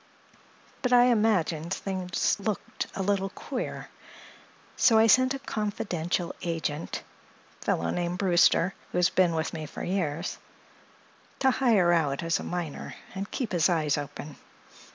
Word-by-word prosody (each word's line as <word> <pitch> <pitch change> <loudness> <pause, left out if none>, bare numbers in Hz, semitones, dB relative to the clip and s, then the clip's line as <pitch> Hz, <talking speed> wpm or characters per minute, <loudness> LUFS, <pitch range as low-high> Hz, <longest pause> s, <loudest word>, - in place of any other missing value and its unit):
But 250 - 0
I 245 -1 +7
imagined 205 -9 +2
things 185 -2 -1
looked 205 0 -3
a 195 - -2
little 195 0 0
queer, 250 +6 -5 0.9
so 225 - +5
I 220 - +6
sent 255 +4 +5
a - - -3
confidential 200 -8 -2
agent—fellow 155 - -4
named 175 0 -2
Brewster, 180 -1 +4 0.2
who - - -2
has 180 0 +3
been 175 -3 +3
with 160 0 -2
me 155 -2 -5
for - - -7
years—to 180 - -4
hire 220 -10 +3
out 150 -3 +1
as 165 0 +1
a - - -6
miner 175 -5 -5 0.2
and 195 +2 -5
keep 250 -5 -3
his 175 0 +3
eyes 155 -4 +2
open. 145 +1 -6
180 Hz, 130 wpm, -28 LUFS, 165-210 Hz, 0.9 s, I